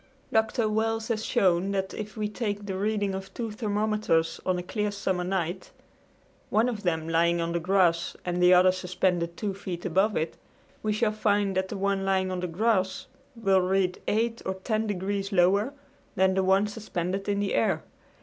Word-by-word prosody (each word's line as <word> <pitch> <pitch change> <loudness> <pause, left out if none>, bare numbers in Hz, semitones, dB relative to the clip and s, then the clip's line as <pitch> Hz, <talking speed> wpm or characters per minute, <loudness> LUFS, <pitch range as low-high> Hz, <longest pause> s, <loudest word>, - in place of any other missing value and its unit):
Dr. 220 +1 +2
Wells 220 +1 -1
has 220 -2 -1
shown 185 -5 +2
that 190 -1 -2
if 210 0 -7
we 210 -1 -1
take 205 -2 -3
the 195 -2 -3
reading 205 0 0
of 190 0 -6
two 230 -2 -3
thermometers 210 -6 0
on 185 -1 +2
a 180 - -3
clear 210 +3 -2
summer 190 -3 -1
night, 180 -1 -2 0.8
one 220 +3 +3
of 225 -4 -3
them 160 -4 -1
lying 170 +1 +2
on 165 0 -1
the 170 - 0
grass 175 -1 +2
and 180 0 -1
the 180 0 +6
other 185 0 +7
suspended 180 -2 -1
two 205 -3 -2
feet 185 -2 -6
above 190 +4 +2
it, 160 +1 -2 0.4
we 215 - 0
shall 215 +1 +1
find 205 -2 +1
that 190 0 0
the 205 - -5
one 195 0 0
lying 190 -1 +1
on 185 - -2
the 180 - -2
grass 190 +1 0 0.3
will 195 -5 +3
read 185 0 0
8 230 +2 0
or 190 - -2
10 215 +3 -1
degrees 195 0 -2
lower 195 +6 +3 0.4
than 190 0 +3
the 190 0 +1
one 190 +2 +4
suspended 195 -2 -3
in 200 0 +1
the 205 -1 -1
air. 115 - +1
195 Hz, 190 wpm, -27 LUFS, 180-210 Hz, 0.8 s, other